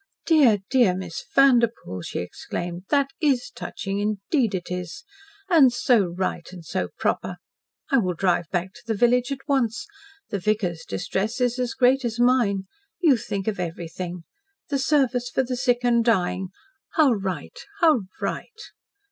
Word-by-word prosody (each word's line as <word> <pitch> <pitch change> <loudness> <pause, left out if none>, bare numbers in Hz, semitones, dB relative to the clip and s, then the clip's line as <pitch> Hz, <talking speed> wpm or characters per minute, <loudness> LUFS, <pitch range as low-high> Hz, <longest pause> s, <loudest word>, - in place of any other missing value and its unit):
"Dear, 285 -10 +5
dear, 240 -9 +4
Miss 180 -3 -6
Vanderpoel!" 235 - +3
she - - -6
exclaimed. 175 - -6
"THAT 280 -1 +2
is 275 -5 +1
touching, 195 0 -4
indeed 215 +3 0
it 180 -1 -5
is! 180 -2 -5 0.4
And 310 -9 +6
so 235 -3 +3
right 185 -2 -3
and 175 -3 -11
so - - -2
proper. - - -1 0.6
I 270 - +5
will 185 -5 -1
drive 175 -1 +1
back 185 +1 -2
to - - -15
the 225 - 0
village 245 +4 +2
at 275 +1 -6
once. 270 +1 0 0.5
The 200 - -1
vicar's 185 -4 -1
distress 195 - -2
is 250 0 +1
as 245 -2 -2
great 260 +2 +3
as 235 -1 -3
mine. 240 -6 +3 0.4
You 320 -7 +5
think 205 -4 -4
of 210 -4 -1
everything. 175 0 -5 0.5
The 280 -2 0
service 260 -4 +1
for 265 - +1
the 250 0 -3
sick 245 -1 +1
and 235 -1 +3
dying. 190 -4 +1 0.5
How 310 -8 +5
right 190 -8 -3 0.2
how 315 - +5 0.2
right!" 455 -3 -4
230 Hz, 155 wpm, -24 LUFS, 185-260 Hz, 0.6 s, And